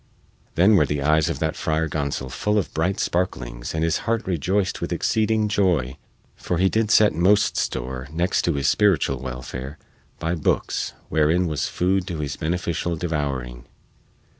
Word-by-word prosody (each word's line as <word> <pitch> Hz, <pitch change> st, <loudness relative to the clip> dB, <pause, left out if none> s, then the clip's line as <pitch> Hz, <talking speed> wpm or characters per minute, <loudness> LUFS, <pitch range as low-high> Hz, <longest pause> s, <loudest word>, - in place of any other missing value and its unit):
Then 95 Hz, +5 st, +5 dB
were -, -, +4 dB
the 75 Hz, -1 st, -2 dB
eyes 75 Hz, +1 st, +3 dB
of -, -, -2 dB
that -, -, -1 dB
Friar 80 Hz, +1 st, 0 dB
Gonsol 70 Hz, -4 st, -3 dB
full 105 Hz, -, 0 dB
of 100 Hz, -, -1 dB
bright 90 Hz, +5 st, 0 dB
sparklings -, -, -2 dB
and 80 Hz, -, 0 dB
his 80 Hz, -1 st, +2 dB
heart 115 Hz, 0 st, 0 dB
rejoiced 95 Hz, +3 st, -1 dB
with -, -, -3 dB
exceeding 110 Hz, 0 st, +1 dB
joy, 90 Hz, -11 st, +1 dB, 0.4 s
for 90 Hz, -, -3 dB
he 95 Hz, +2 st, +3 dB
did 110 Hz, 0 st, 0 dB
set 105 Hz, -3 st, +5 dB
most 100 Hz, +5 st, +3 dB
store, 65 Hz, +1 st, -3 dB
next 85 Hz, +3 st, +1 dB
to 85 Hz, -, +2 dB
his 70 Hz, -1 st, 0 dB
spiritual 100 Hz, -5 st, +2 dB
welfare, 65 Hz, +2 st, -6 dB, 0.4 s
by 80 Hz, +1 st, -2 dB
bookes 80 Hz, -4 st, -1 dB, 0.2 s
wherein 80 Hz, +4 st, +2 dB
was 75 Hz, -4 st, -1 dB
food 95 Hz, +1 st, 0 dB
to 85 Hz, -4 st, -4 dB
his 75 Hz, -2 st, -3 dB
beneficial 85 Hz, +1 st, -2 dB
devouring. 70 Hz, -7 st, -3 dB
80 Hz, 165 wpm, -23 LUFS, 70-95 Hz, 0.4 s, Then